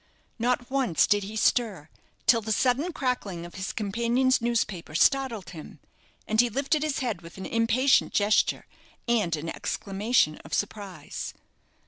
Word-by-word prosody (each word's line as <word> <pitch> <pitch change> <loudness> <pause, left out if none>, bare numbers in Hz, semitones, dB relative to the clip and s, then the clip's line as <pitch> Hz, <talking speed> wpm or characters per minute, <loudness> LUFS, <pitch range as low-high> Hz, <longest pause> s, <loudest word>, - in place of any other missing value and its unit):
Not 245 +1 0
once 260 - +2
did 205 -1 +2
he 210 +2 -7
stir 210 - +1 0.4
till 230 -1 +5
the 220 +1 -4
sudden 260 - +1
crackling 250 - -3
of 175 - -11
his 190 +1 -4
companion's 235 +5 +1
newspaper 215 -9 -1
startled 260 - +2
him, 155 -2 -11 0.5
and 220 +1 +4
he 245 - 0
lifted 275 +6 0
his 305 -3 -1
head 230 -9 -2
with 170 +1 -12
an 190 - -6
impatient 235 +4 +3
gesture 205 +1 +2 0.4
and 210 -9 +2
an 155 +2 -6
exclamation 200 -3 0
of 160 - -5
surprise. 205 -2 -5
225 Hz, 145 wpm, -27 LUFS, 195-250 Hz, 0.5 s, till